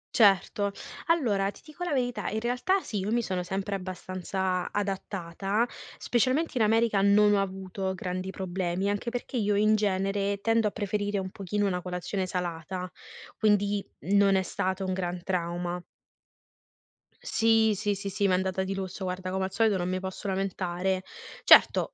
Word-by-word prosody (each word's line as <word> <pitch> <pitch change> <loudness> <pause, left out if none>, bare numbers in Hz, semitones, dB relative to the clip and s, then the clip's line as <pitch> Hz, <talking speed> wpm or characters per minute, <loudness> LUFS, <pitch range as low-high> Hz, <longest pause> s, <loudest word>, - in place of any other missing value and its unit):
Certo. 200 -1 +4 0.4
Allora, 215 -13 +2
ti - - -11
dico 315 +3 -8
la 350 - -2
verità, 245 -3 -1
in 220 - -2
realtà 250 - +1
sì, 210 - -4
io 200 +3 -2
mi 235 0 +2
sono 185 -2 -2
sempre 195 +2 -3
abbastanza 185 0 -3
adattata, 195 +1 -1 0.3
specialmente 255 +7 +1
in 235 - +1
America 225 -2 +3
non 205 +1 +5
ho 200 - +3
avuto 190 0 -3
grandi 185 +1 -4
problemi, 185 +1 -2
anche 205 +4 -2
perché 245 +1 -4
io 205 -2 +1
in 215 +1 +4
genere 200 0 0
tendo 225 +1 +2
a - - -1
preferire 205 -1 -2
un 190 -1 -3
pochino 200 +2 -2
una 180 -2 0
colazione 180 +1 -3
salata, 180 0 -3 0.5
quindi 205 -1 +2 0.2
non 200 +3 +4
è 190 - +2
stato 190 0 -2
un 185 - -1
gran 180 -1 -2
trauma. 175 -1 -2 1.4
Sì, 225 -1 +3
sì, 205 0 -1
sì, 200 0 -5
sì, 200 +1 +1
m'è 185 - +2
andata 190 0 0
di 195 +1 -3
lusso, 190 0 -5
guarda, 185 0 -3
come 190 0 0
al 190 - -5
solito 210 0 +2
non 180 0 -2
mi 185 0 -1
posso 190 +2 -6
lamentare. 190 -1 -1 0.4
Certo, - - +6
195 Hz, 165 wpm, -28 LUFS, 185-210 Hz, 1.4 s, Certo